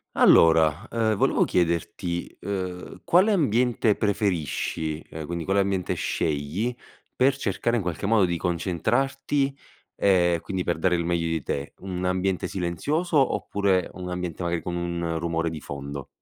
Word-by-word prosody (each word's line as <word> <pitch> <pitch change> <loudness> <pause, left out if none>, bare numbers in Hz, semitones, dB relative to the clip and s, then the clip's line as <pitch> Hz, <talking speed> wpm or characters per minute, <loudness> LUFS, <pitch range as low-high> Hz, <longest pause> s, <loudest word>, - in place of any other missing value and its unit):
Allora, 80 +4 +5
ehm, 110 -2 +1
volevo - - +3
chiederti: 85 0 -1
ehm, 95 -2 -5
quale 185 +5 +5
ambiente 125 - +2
preferisci, 85 -6 -1
ehm, 80 -2 -7
quindi 85 -1 -3
quale 95 +1 +2
ambiente 95 -2 0
scegli 80 +11 -1 0.4
per 135 +1 +3
cercare, 115 -1 -1
in 110 - -2
qualche 90 +3 -3
modo, 105 -3 +4
di 85 -1 -1
concentrarti, 120 - 0 0.4
ehm, 85 -3 +3
quindi 95 +1 -3
per 85 -2 -1
dare 90 +1 +2
il 85 -1 -1
meglio 85 -1 0
di 80 -3 -2
te? 70 +1 -4
Un 95 -1 -4
ambiente 95 0 0
silenzioso 145 - -1 0.2
oppure 100 -3 0
un 90 -1 -6
ambiente 90 -1 -4
magari 85 -1 -1
con 90 - -3
un 85 -1 -2
rumore 85 0 -1
di 80 -2 -6
fondo? 70 -1 -6
90 Hz, 150 wpm, -25 LUFS, 85-105 Hz, 0.4 s, Allora